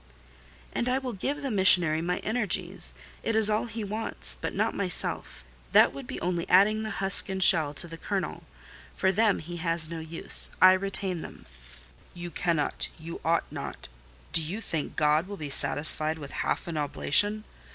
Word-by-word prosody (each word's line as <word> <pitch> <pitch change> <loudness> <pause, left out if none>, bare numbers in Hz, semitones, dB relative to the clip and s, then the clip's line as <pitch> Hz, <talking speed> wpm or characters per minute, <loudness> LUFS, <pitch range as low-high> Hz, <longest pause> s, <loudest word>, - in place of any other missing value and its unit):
"And 240 - -1
I 255 - +1
will 260 -2 -5
give 285 +9 -4
the 270 - -2
missionary 180 -6 +3
my 180 +1 -2
energies—it 210 0 -3
is 220 -1 +3
all 210 +2 0
he 225 -1 -6
wants—but 215 +2 -3
not - - 0
myself: 180 - 0 0.3
that - - +6
would 135 -2 -9
be - - -6
only 175 -1 -2
adding 210 +4 +4
the 220 - -4
husk 195 0 +4
and 190 - -3
shell 155 -6 +6
to 170 - -4
the 165 0 -10
kernel. 195 +1 -4 0.5
For 190 - +1
them 215 +1 +2
he 175 +2 -8
has 165 -1 +1
no 165 - -5
use: 160 +1 +2
I 185 - +8
retain 190 -2 -1
them." - - -11 0.7
"You 175 0 -7
cannot—you 165 0 -3
ought 165 +1 +1
not. - - -7 0.4
Do 165 - +5
you 170 +8 -5
think 165 -8 -4
God 150 +3 +2
will 200 0 -7
be 150 -4 -7
satisfied 155 +3 +2
with 145 -3 -9
half - - -3
an 165 -2 -4
oblation? 205 +8 0
180 Hz, 170 wpm, -27 LUFS, 160-205 Hz, 0.7 s, I